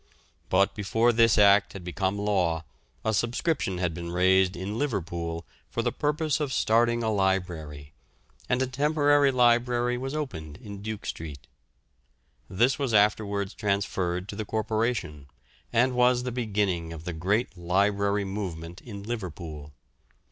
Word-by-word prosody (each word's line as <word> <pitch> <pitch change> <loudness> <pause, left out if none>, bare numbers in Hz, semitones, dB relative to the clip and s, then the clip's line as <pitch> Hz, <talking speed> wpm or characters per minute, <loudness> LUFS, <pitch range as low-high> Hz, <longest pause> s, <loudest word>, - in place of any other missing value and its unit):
But 100 +1 +3
before 115 +3 +2
this 115 -1 +4
act 100 -1 +5
had 95 - -8
become 95 +2 -2
law, 90 -6 0 0.4
a 110 - +1
subscription 120 - 0
had 85 -2 -1
been 85 +1 -6
raised 95 +1 +3
in 100 +5 -4
Liverpool 85 - -3 0.2
for - - -2
the - - +1
purpose 150 0 0
of 145 -3 -2
starting 120 0 +2
a 110 - +1
library, 85 -7 -2 0.6
and 125 +1 +2
a - - +1
temporary 145 +1 +3
library 120 0 +2
was 135 +3 -4
opened 80 - -5
in 100 -5 -9
Duke 110 0 -5
Street. 75 -5 -6 1.0
This 120 +8 +2
was 130 -6 0
afterwards 100 -1 +2
transferred 95 -3 -1
to 100 - -5
the 110 - -3
Corporation, 110 - -2 0.4
and 125 +3 +3
was 125 0 +3
the 125 - -3
beginning 100 -8 -1
of 80 -1 -9
the 90 - -4
great 100 +6 0
library 100 +3 +1
movement 90 -4 -5
in 100 -4 -9
Liverpool. 85 -9 -6
100 Hz, 140 wpm, -27 LUFS, 90-120 Hz, 1.0 s, act